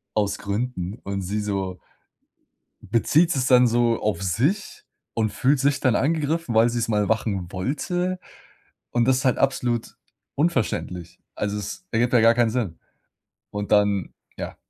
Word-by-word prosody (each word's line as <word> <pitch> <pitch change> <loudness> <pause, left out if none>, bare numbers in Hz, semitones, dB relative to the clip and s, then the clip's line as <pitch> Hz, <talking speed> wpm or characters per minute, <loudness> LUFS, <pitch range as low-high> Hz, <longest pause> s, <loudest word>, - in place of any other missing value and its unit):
aus 100 -2 +1
Gründen," 100 -1 -3
und 100 0 -3
sie 105 +4 -2
so 95 -3 -3 1.0
bezieht 160 +9 +2
es 130 -1 0
dann 125 -1 +6
so 120 0 +2
auf 105 -4 -1
sich 135 - -1 0.3
und 110 -2 0
fühlt 135 +6 +2
sich 140 +1 +1
dann 130 -3 +3
angegriffen, 155 -2 0
weil 115 +2 +5
sie 120 - -2
es 115 - -1
mal 105 -2 +1
machen 100 -5 -1
wollte 175 - -2 0.7
und 120 -1 +2
das 130 -1 +3
ist - - -4
halt 130 - +3
absolut 125 -4 0 0.4
unverständlich. 115 - -1 0.2
Also 105 0 -2
es 185 - -6
ergibt 120 +2 +1
ja 120 - +5
gar 115 +1 +6
keinen 120 -1 +2
Sinn. 110 -8 -2 0.7
Und 105 0 -4
dann 100 -3 +2 0.2
ja. - - -6
115 Hz, 155 wpm, -24 LUFS, 100-130 Hz, 1.0 s, dann